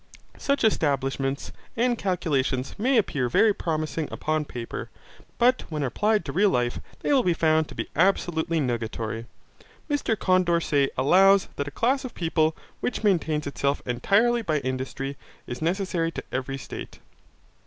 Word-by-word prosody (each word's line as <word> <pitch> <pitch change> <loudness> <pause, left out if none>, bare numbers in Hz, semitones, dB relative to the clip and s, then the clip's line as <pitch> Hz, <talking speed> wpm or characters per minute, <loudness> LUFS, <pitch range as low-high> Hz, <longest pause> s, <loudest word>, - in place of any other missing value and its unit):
Such 280 0 0
establishments 140 -7 0 0.3
and 240 +1 +2
calculations 145 - -1
may 255 +4 +3
appear 145 - +1
very 215 - +4
promising 155 -3 -2
upon 155 -1 -1
paper, 120 -4 -6 0.5
but 250 +2 +4
when 150 -3 -2
applied 210 - +1
to 140 - -3
real 195 +7 +3
life 120 -5 0 0.2
they - - +1
will 270 - +5
be 175 -7 +1
found 160 -1 +2
to - - -11
be - - -3
absolutely 170 -2 +2
nugatory. 115 -3 -3 0.6
Mr 290 -7 0
Condorcet 170 -7 +2
allows 190 +8 +5
that 140 - -3
a 145 - -9
class 265 +4 +2
of 255 - -7
people 160 -2 +1 0.2
which 250 - -3
maintains 160 -7 +1
itself 140 0 -1
entirely 205 - +2
by 160 -8 0
industry 130 +1 -4 0.3
is 120 - -6
necessary 175 -1 0
to - - -5
every 135 +1 -3
state. 135 - -8
160 Hz, 145 wpm, -25 LUFS, 135-200 Hz, 0.6 s, will